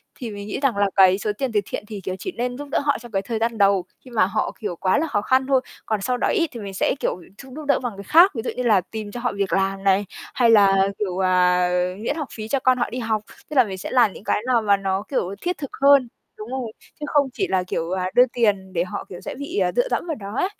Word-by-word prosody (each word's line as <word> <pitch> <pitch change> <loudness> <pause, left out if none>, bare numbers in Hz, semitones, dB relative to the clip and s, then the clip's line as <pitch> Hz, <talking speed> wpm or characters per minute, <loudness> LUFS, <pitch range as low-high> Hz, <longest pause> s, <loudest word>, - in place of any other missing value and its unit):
thì 235 -4 -6
mình 205 0 -7
nghĩ 210 - -4
rằng 270 -6 +1
là 200 -1 +2
cái 190 -1 +6
số 210 +1 -1
tiền 265 0 -2
từ 215 - +2
thiện - - -5
thì, 210 -2 -7
kiểu, 185 0 -4
chỉ 375 - -4
nên 245 -3 -3
giúp 290 - -7
đỡ - - +2
họ 285 0 +1
trong 240 -1 -12
cái 195 -2 0
thời 225 +1 -4
gian 230 0 -1
đầu, 200 -3 +3 0.2
khi 255 - -13
mà 220 -6 +3
họ, 210 +3 -1
kiểu, 205 -6 -4
quá 185 +2 +1
là 320 +2 0
khó 205 -9 0
khăn 260 +5 +2
thôi. 270 -2 +3 0.2
Còn 215 -2 -1
sau 250 +4 0
đó - - 0
ấy 340 -5 +1
thì 235 - -8
mình 200 -2 -7
sẽ, 190 - 0
kiểu, - - -1 0.2
giúp 265 +2 -12
giúp 305 0 -7
đỡ 280 - +3
bằng 245 -3 -4
cái 200 - -7
khác, 340 - +6
ví 225 - -2
dụ - - -1
như 250 - -2
là 215 -6 +4
tìm 210 +2 -7
cho 240 - -6
họ 245 0 -1
việc 195 -4 -1
làm 195 0 0
này, 195 +1 +3 0.3
hay 240 -2 +3
là, 195 -3 +5
kiểu, 190 -3 -2
à, 180 -1 +3 0.3
miễn 230 +6 -2
học 300 -4 -4
phí 215 -1 -6
cho 275 +4 0
con 255 0 +3
họ 240 - -1
đi 250 - -5
học, 220 -2 -1 0.3
tức 300 - -6
là 260 - +7
mình 195 -4 -6
sẽ 185 - -6
làm 240 -6 +4
những - - -12
cái 210 - 0
nào 245 -3 +3
mà 205 -2 +3
nó, 195 0 -2
kiểu, 200 -8 -1
thiết 355 0 -2
thực 280 - -6
hơn 280 -2 +6 0.3
đúng 215 +2 -8
rồi, 255 -3 -4 0.3
chứ 300 - -4
không 285 -2 +2
chỉ 385 - -1
là, 185 -1 +1
kiểu, 170 -2 -3
à, 185 0 -1
đưa 250 - +7
tiền 200 -5 0
để 170 -1 +1
họ, 180 - -6
kiểu, 180 - -9
sẽ - - -6
bị, 285 +8 -6
ờ, - - +2
dựa - - +2
dẫm - - -1
vào 320 - -2
đó 200 -4 -8
ấy. 370 - +1
220 Hz, 295 wpm, -22 LUFS, 195-255 Hz, 0.3 s, là